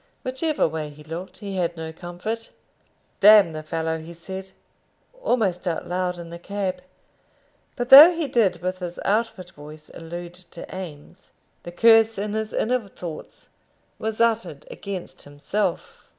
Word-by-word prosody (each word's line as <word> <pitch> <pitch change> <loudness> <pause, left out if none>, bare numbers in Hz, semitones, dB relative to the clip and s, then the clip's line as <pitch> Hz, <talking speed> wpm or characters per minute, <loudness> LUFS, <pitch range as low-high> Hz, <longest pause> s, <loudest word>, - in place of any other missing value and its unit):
Whichever 265 - 0
way 155 -1 -4
he 150 +1 -14
looked 175 +4 -7
he 200 -2 -6
had 170 -1 -1
no 160 0 -6
comfort. 180 +7 -6 0.7
"D 200 - +5 0.2
the 155 0 -6
fellow!" 160 +1 -3
he 165 +2 -10
said, 190 +3 -8 0.7
almost 200 - 0
out 165 - -2
loud 180 0 -2
in 170 -1 -9
the 170 - -8
cab; 190 -1 -3 0.9
but 245 0 -3
though 290 +6 +12
he 330 -3 -2
did 195 -9 +1
with 185 0 -2
his 175 -1 -6
outward 210 -4 -1
voice 150 -1 -13
allude 170 +1 -8
to 180 -1 -11
Eames, 175 -1 -10 0.3
the 175 - -9
curse 225 +3 +5
in 205 +1 -3
his 220 0 -3
inner 240 -2 0
thoughts 175 -4 -10 0.5
was 220 0 -3
uttered 230 - 0
against 200 - -7
himself. 145 +9 -3
185 Hz, 150 wpm, -24 LUFS, 170-220 Hz, 0.9 s, though